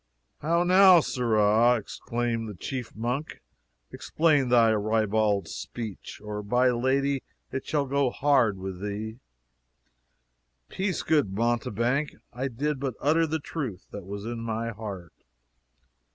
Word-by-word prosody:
"How 170 +3 +1
now, 185 0 +7
sirrah!" 115 -3 +3
exclaimed 115 +1 -3
the 105 - -8
chief 125 +6 -6
monk, 125 +7 -3 0.5
"explain 150 -5 +1
thy 115 -2 +5
ribald 105 -2 +1
speech, 110 +5 -7
or 105 0 -4
by'r 125 +4 +2
Lady 135 +3 +1 0.3
it 130 - -5
shall 145 -2 0
go 140 0 +1
hard 125 -7 +2
with 95 -1 -6
thee." 105 +3 -5 1.5
"Peace, 190 -2 -2
good 145 -11 +2
mountebank, 120 +4 0 0.2
I 130 +2 -2
did 140 +3 -2
but 135 -3 -3
utter 160 +3 +2
the 160 +1 -1
truth 135 - -6
that 100 -3 -8
was 100 +1 -6
in 120 0 -4
my 115 0 -3
heart. 100 -6 -8
120 Hz, 125 wpm, -27 LUFS, 105-140 Hz, 1.5 s, now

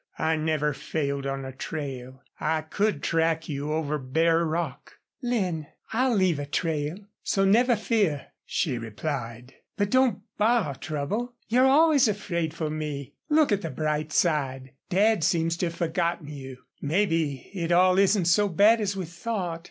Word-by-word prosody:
"I 160 0 +1
never 155 -1 0
failed 140 -1 -3
on 135 0 -3
a 130 - -6
trail. 130 -3 -6 0.2
I 160 -1 0
could 200 +1 -1
track 165 -1 +1
you 145 0 -3
over 150 -1 -1
bare 165 +6 +2
rock." 160 -4 -3 0.3
"Lin, 185 - -1 0.3
I'll 250 +1 +2
leave 185 -6 +2
a 145 - -4
trail, 155 +1 -1 0.2
so 195 0 +1
never 240 +5 +4
fear," 210 - 0
she 135 -9 -1
replied. 115 +1 -5 0.2
"But 205 -1 0
don't 255 -6 +3 0.2
borrow 215 -8 +2
trouble. 180 - -3
You're 250 +3 +5
always 290 -1 +5
afraid 175 -6 -2
for 160 -1 -3
me. 150 -3 -5 0.2
Look 305 -3 +4
at 200 -1 +2
the 165 - -4
bright 155 0 -2
side. 135 -6 0 0.2
Dad 205 0 +3
seems 165 0 +2
to 175 - 0
have 170 - -6
forgotten 170 -2 -1
you. 130 -3 -9 0.2
Maybe 160 -4 0
it 175 -3 -2
all 185 +2 +5
isn't 195 -2 +3
so 205 +5 +4
bad 210 +6 +5
as 200 -1 -1
we 185 - -3
thought. 175 0 -4
165 Hz, 160 wpm, -26 LUFS, 145-200 Hz, 0.3 s, You're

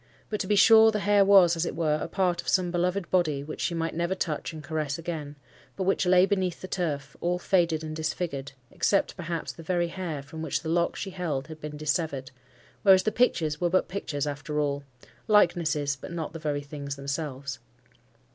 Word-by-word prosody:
But, 210 - -1
to 190 - -2
be 210 - +3
sure, 220 +2 +8
the 210 -2 -1
hair 205 0 +4
was, 190 -4 +6
as 165 - -1
it - - -3
were, 155 -2 +1
a - - -2
part 180 -3 0
of - - -18
some 180 -2 +2
beloved 180 +1 -1
body 155 -6 +1
which 155 +2 -7
she 170 - -1
might 165 0 -2
never 170 +3 -1
touch 160 -5 -3
and 155 -1 -9
caress 150 -2 -2
again, 155 -3 -5 0.4
but 190 - -2
which 190 0 +1
lay 180 0 +6
beneath 190 -3 -1
the 185 - -7
turf, 145 -7 -3
all 175 +1 +1
faded 170 -3 +1
and 155 0 -5
disfigured, 155 -3 -3 0.2
except 200 - +1
perhaps 170 -2 -4
the - - -12
very 175 0 0
hair, 165 -6 -5
from 160 +3 -9
which 160 +1 -2
the 160 - -3
lock 170 +1 +1
she 195 - -5
held 155 -8 -3
had 155 -1 -9
been 150 0 -6
dissevered; 150 -3 -2 0.5
whereas 190 -2 +6
the 215 - +1
pictures 165 -10 +1
were 175 - +2
but 185 +2 +2
pictures 155 -7 -3
after 145 +1 -3
all—likenesses, 145 - 0
but - - -9
not 165 -2 -4
the 165 - -6
very 145 -2 -2
things 140 -1 -6
themselves. 140 -1 -4
165 Hz, 205 wpm, -27 LUFS, 150-185 Hz, 0.5 s, sure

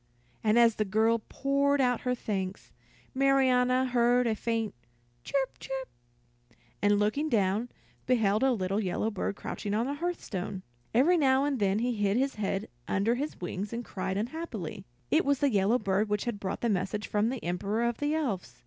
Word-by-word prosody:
And 215 +1 +3
as 230 -2 +5
the 215 - +2
girl 220 +3 +2
poured 280 +1 +1
out 245 -3 +2
her 250 0 0
thanks, 195 -4 -4 0.4
Marianna 260 -1 +3
heard 245 0 +3
a 230 - +2
faint 225 0 -2 0.5
"chirp, 270 - -2
chirp," 265 -1 -5 0.9
and 205 0 +4
looking 215 +10 +1
down, 210 0 +1 0.4
beheld 220 -4 +2
a 265 0 +4
little 195 -3 0
yellow 210 +2 -1
bird 200 0 -2
crouching 205 0 -4
on 225 +2 +1
the 280 - -2
hearthstone. 215 - -4 0.3
Every 300 +10 +4
now 265 -2 +4
and 280 -3 -1
then 200 -1 +2
he 245 +3 0
hid 205 -1 +1
his 270 +2 +1
head 200 0 -2 0.2
under 200 +4 +1
his 285 +5 -4
wings 190 +3 -4
and 235 +1 -4
cried 190 0 -3
unhappily. 230 - -5 0.3
It - - +4
was 280 0 +2
the 280 0 +2
yellow 200 +4 +3
bird 205 -1 0
which 210 0 -1
had 235 -4 -3
brought 190 -2 -4
the 235 - +1
message 200 +1 -1
from 210 +2 +1
the 255 -1 -4
Emperor 195 +6 -1
of 235 -1 0
the 290 +1 0
Elves. 195 - -3
230 Hz, 180 wpm, -29 LUFS, 205-260 Hz, 0.9 s, as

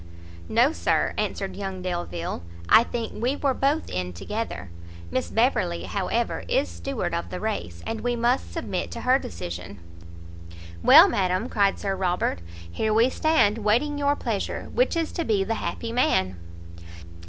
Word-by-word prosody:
"No, 240 +6 +4
Sir," - - +1
answered 190 -2 -2
young 190 -2 -5
Delvile, 175 - -3 0.3
"I 225 - +7
think 230 -3 -5
we 250 +4 +1
were 280 -2 +1
both 280 +5 0
in 90 0 -3
together; 95 - -5 0.4
Miss - - -1
Beverley, 85 0 +1
however, 90 -2 -1
is 95 - +1
steward 85 0 -4
of 85 0 -2
the - - -5
race, 85 0 -4
and 225 -1 -3
we 245 0 0
must 240 +2 +1
submit - - -3
to - - -6
her 255 +2 +4
decision." 90 - -7 1.0
"Well, 320 +8 +9
madam," 190 - 0
cried 200 -2 +2
Sir 195 -1 -2
Robert, 180 - 0 0.3
"here 215 - -1
we 235 +4 +4
stand, 255 -10 +2
waiting 245 +8 +1
your 285 0 +2
pleasure. - - -3
Which - - +2
is 330 -1 -1
to 335 - -2
be 210 -8 +1
the 225 - -1
happy 230 - -3
man!" 95 - +2
210 Hz, 155 wpm, -25 LUFS, -, 1.0 s, Well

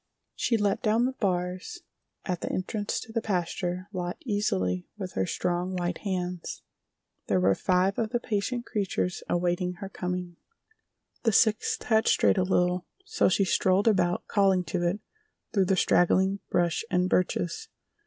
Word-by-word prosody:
She 230 - +1
let 205 -2 +1
down 225 +2 +2
the 260 - 0
bars 185 - -2 0.4
at 180 -2 -2
the - - -3
entrance 205 +3 -2
to 225 - -10
the 230 - 0
pasture 180 -2 -2
lot 180 -1 -3
easily 95 - -1
with 190 -3 -6
her 95 -1 0
strong, 180 +1 -1
white 175 -1 -2
hands. 180 -3 -4 0.6
There 95 - +2
were 95 +2 +4
five 185 - +1
of 225 -2 0
the 240 +1 0
patient 235 +2 -2
creatures 200 -5 -2
awaiting 175 +1 0
her 190 +2 -8
coming. 180 -2 -4 0.8
The 225 - +2
sixth 215 +1 +2
had 220 -1 +2
strayed - - +4
a - - +3
little, 180 -1 +1 0.2
so 445 - +2
she 195 +2 +2
strolled 190 +3 +2
about, 180 -5 +2
calling 195 -3 +3
to 180 0 -2
it, 190 +5 -2 0.5
through 195 -3 +3
the 190 +1 +2
straggling 190 +3 +3
brush 175 +1 +1
and 180 -2 +2
birches. 185 - 0
185 Hz, 155 wpm, -27 LUFS, 180-205 Hz, 0.8 s, were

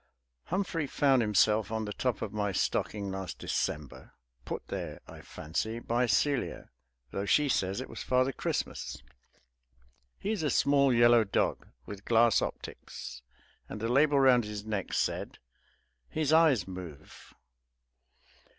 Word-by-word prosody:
Humphrey 175 -5 -1
found 135 -2 +3
himself 105 0 +2
on 110 -1 -2
the 105 - -5
top 125 -2 -1
of 100 - -5
my 105 -1 -1
stocking 100 +2 -1
last 95 -1 -5
December, 75 -3 -4 0.3
put - - -5
there, - - -5
I - - -11
fancy, 110 +9 -4
by 120 +1 0
Celia, 140 +3 0 0.4
though 100 +1 -3
she 150 +6 +4
says 95 -5 0
it 130 - -5
was - - -8
Father 130 +1 +2
Christmas. - - -4 1.1
He 205 - -3
is 215 - -1
a 150 - 0
small 140 0 +3
yellow 120 -1 +6
dog, 100 - -1 0.2
with 100 0 -9
glass 115 -1 +4
optics, - - -7 0.5
and - - -6
the 115 +2 -2
label 140 +3 +4
round 130 -3 +5
his 105 -1 -6
neck 105 -4 -3
said, - - -1 0.7
"His 155 -1 0
eyes 155 - +4
move." 90 -6 -10
115 Hz, 140 wpm, -30 LUFS, 100-135 Hz, 1.1 s, yellow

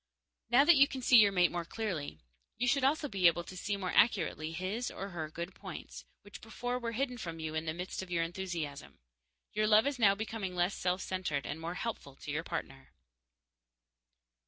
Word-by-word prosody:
Now 255 +4 +6
that 335 -1 +7
you 280 +1 +7
can 260 -2 -6
see 250 - +7
your 205 -2 +6
mate 180 -2 +3
more 175 -1 -2
clearly, 170 - -4 0.4
you 245 - 0
should 275 +2 +2
also 295 +2 +2
be 195 -8 +3
able 170 +1 +2
to 185 - -10
see 200 +2 -2
more 185 -2 -3
accurately 180 -7 +2
his, 185 +8 -3
or 195 - -6
her, 160 -4 -5
good 170 +4 -6
points, 65 0 -9 0.2
which 200 -3 -11
before 245 +3 -3
were 230 -1 -3
hidden 250 0 -2
from 165 -5 -6
you 160 -1 -4
in 160 +1 -2
the 160 - -2
mist 180 +2 -4
of 190 - -8
your 170 -2 +1
enthusiasm. 165 - -5 0.6
Your 215 0 +1
love 215 +2 +6
is 280 -2 -1
now 200 -3 +5
becoming 210 -3 -4
less 175 +2 +1
self 180 +1 -1
centered 180 -7 -2
and 160 - -5
more 170 +2 -4
helpful 180 -11 -5
to 145 - -7
your 155 +3 -2
partner. 135 -6 -6
185 Hz, 205 wpm, -32 LUFS, 165-225 Hz, 0.6 s, that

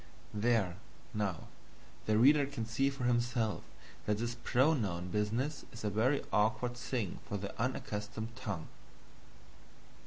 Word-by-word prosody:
There, 105 -4 +2 0.4
now, 100 -6 -1 0.6
the 110 0 +4
reader 140 +4 +6
can 135 -5 -3
see 120 +5 +2
for 135 -2 -5
himself 120 -2 +1 0.5
that 105 -1 +2
this 120 +2 -1
pronoun 120 - +2
business 115 - 0
is 115 - -9
a 105 - 0
very 125 +8 +2
awkward 110 +4 +2
thing 120 -5 -2
for 100 - -1
the 100 0 -5
unaccustomed 110 -2 -3
tongue. 100 -9 -4
115 Hz, 125 wpm, -34 LUFS, 105-125 Hz, 0.6 s, reader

